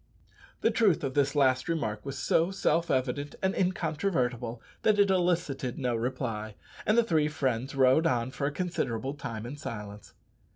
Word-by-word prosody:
The -, -, +3 dB
truth 205 Hz, -10 st, +3 dB
of 135 Hz, -2 st, -2 dB
this 140 Hz, 0 st, +1 dB
last 130 Hz, 0 st, +3 dB
remark 110 Hz, -11 st, -2 dB
was 140 Hz, 0 st, -5 dB
so 165 Hz, +6 st, +2 dB
self 170 Hz, -3 st, +1 dB
evident 135 Hz, +2 st, -1 dB
and 190 Hz, 0 st, +2 dB
incontrovertible 150 Hz, -, -1 dB, 0.2 s
that 215 Hz, -1 st, +3 dB
it 200 Hz, -1 st, +4 dB
elicited 175 Hz, -8 st, 0 dB
no 125 Hz, -3 st, 0 dB
reply, 115 Hz, -3 st, -3 dB, 0.3 s
and 215 Hz, -, +4 dB
the 235 Hz, -, +6 dB
three 160 Hz, -8 st, +2 dB
friends 135 Hz, -3 st, -2 dB
rode 135 Hz, +5 st, +5 dB
on 125 Hz, -3 st, 0 dB
for 140 Hz, +1 st, -2 dB
a -, -, -1 dB
considerable 135 Hz, -8 st, -2 dB
time 115 Hz, -6 st, -6 dB
in 135 Hz, +5 st, -6 dB
silence. 105 Hz, -7 st, -8 dB
140 Hz, 165 wpm, -29 LUFS, 125-165 Hz, 0.3 s, the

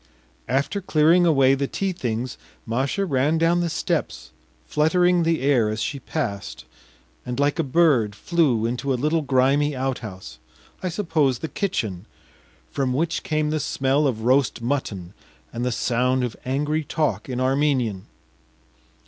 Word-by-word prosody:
After 140 Hz, -, 0 dB
clearing 170 Hz, +1 st, +4 dB
away 135 Hz, -4 st, +4 dB
the 135 Hz, 0 st, 0 dB
tea 195 Hz, +6 st, -2 dB
things, 125 Hz, -7 st, -4 dB, 0.3 s
Masha 130 Hz, -, -1 dB
ran 145 Hz, 0 st, +1 dB
down 165 Hz, +2 st, +2 dB
the 175 Hz, -1 st, 0 dB
steps, -, -, -3 dB, 0.3 s
fluttering 175 Hz, +3 st, +2 dB
the 165 Hz, -1 st, +1 dB
air 130 Hz, -6 st, +3 dB
as 110 Hz, +1 st, -3 dB
she 140 Hz, +5 st, -3 dB
passed, 100 Hz, -, -4 dB, 0.6 s
and 125 Hz, +2 st, -5 dB
like 145 Hz, +3 st, +1 dB
a -, -, +3 dB
bird 135 Hz, -8 st, +2 dB
flew 135 Hz, -4 st, +1 dB
into 125 Hz, +4 st, -2 dB
a -, -, +2 dB
little 155 Hz, +5 st, +1 dB
grimy 140 Hz, +1 st, +2 dB
outhouse 110 Hz, -, -5 dB, 0.4 s
I 185 Hz, -, -2 dB
suppose 160 Hz, -, 0 dB
the 160 Hz, -, -5 dB
kitchen 110 Hz, -, -3 dB, 0.6 s
from 135 Hz, -3 st, -1 dB
which 165 Hz, +5 st, -1 dB
came 155 Hz, -1 st, -1 dB
the 155 Hz, -, 0 dB
smell 135 Hz, +1 st, +1 dB
of 115 Hz, -5 st, -2 dB
roast 130 Hz, +2 st, +2 dB
mutton 115 Hz, -8 st, -3 dB, 0.4 s
and 120 Hz, +1 st, -3 dB
the 125 Hz, -, 0 dB
sound 125 Hz, +2 st, +1 dB
of 120 Hz, -4 st, -3 dB
angry 150 Hz, +4 st, -1 dB
talk 135 Hz, -, -2 dB
in 125 Hz, -1 st, -3 dB
Armenian. 130 Hz, -7 st, 0 dB
135 Hz, 150 wpm, -23 LUFS, 125-155 Hz, 0.6 s, clearing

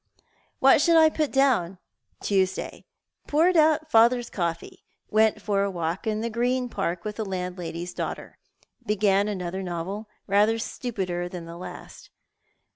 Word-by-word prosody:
What 270 Hz, +2 st, +5 dB
should 335 Hz, +1 st, +5 dB
I 315 Hz, -1 st, +6 dB
put 305 Hz, -2 st, -1 dB
down? 240 Hz, -10 st, +2 dB, 0.2 s
' -, -, -46 dB
Tuesday: 190 Hz, -2 st, -1 dB, 0.4 s
Poured 335 Hz, +5 st, +3 dB
out 315 Hz, -1 st, +3 dB
father's 235 Hz, 0 st, +4 dB
coffee. 170 Hz, -3 st, -4 dB, 0.3 s
Went 215 Hz, 0 st, +3 dB
for 205 Hz, -1 st, 0 dB
a 200 Hz, -, +1 dB
walk 175 Hz, +3 st, -3 dB
in 215 Hz, 0 st, -1 dB
the 235 Hz, -, -2 dB
Green 245 Hz, +2 st, 0 dB
Park 180 Hz, -5 st, -3 dB
with 210 Hz, -1 st, -5 dB
the 220 Hz, -, -2 dB
landlady's 180 Hz, -2 st, -5 dB
daughter. -, -, -6 dB, 0.4 s
Began 205 Hz, -2 st, +2 dB
another 190 Hz, -2 st, -4 dB
novel, 190 Hz, +4 st, -5 dB, 0.2 s
rather 210 Hz, +3 st, +3 dB
stupider 190 Hz, -7 st, -4 dB
than 175 Hz, -2 st, -7 dB
the 165 Hz, 0 st, -9 dB
last. 180 Hz, -, -10 dB
205 Hz, 145 wpm, -25 LUFS, 180-240 Hz, 0.4 s, I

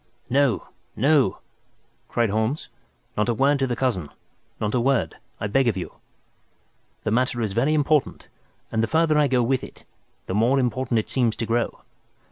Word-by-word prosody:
"No, 135 Hz, -4 st, +2 dB, 0.3 s
no," 135 Hz, -5 st, +3 dB, 0.7 s
cried 115 Hz, -4 st, 0 dB
Holmes, 110 Hz, +8 st, -1 dB, 0.5 s
"not 105 Hz, +3 st, +1 dB
a 120 Hz, -, +1 dB
word 140 Hz, +3 st, +3 dB
to 135 Hz, -, +1 dB
the 120 Hz, -, -1 dB
cousin—not 105 Hz, -, -4 dB
a 125 Hz, -, +2 dB
word, 135 Hz, +1 st, +1 dB, 0.2 s
I -, -, -3 dB
beg 125 Hz, +5 st, +2 dB
of 110 Hz, -5 st, +1 dB
you. 90 Hz, -, -5 dB, 1.1 s
The 110 Hz, -, -1 dB
matter 125 Hz, +1 st, +1 dB
is 110 Hz, -4 st, -1 dB
very 135 Hz, +8 st, +2 dB
important, 150 Hz, -1 st, +1 dB, 0.4 s
and 110 Hz, -, +1 dB
the 115 Hz, -, +1 dB
farther 160 Hz, +1 st, +3 dB
I 150 Hz, -, +4 dB
go 125 Hz, -2 st, +2 dB
with 130 Hz, +2 st, 0 dB
it, -, -, -11 dB, 0.4 s
the -, -, -4 dB
more 115 Hz, +7 st, +3 dB
important 130 Hz, -1 st, 0 dB
it 110 Hz, -, 0 dB
seems 120 Hz, -4 st, +1 dB
to 115 Hz, -, -3 dB
grow. 115 Hz, +1 st, -1 dB
125 Hz, 170 wpm, -24 LUFS, 110-135 Hz, 1.1 s, I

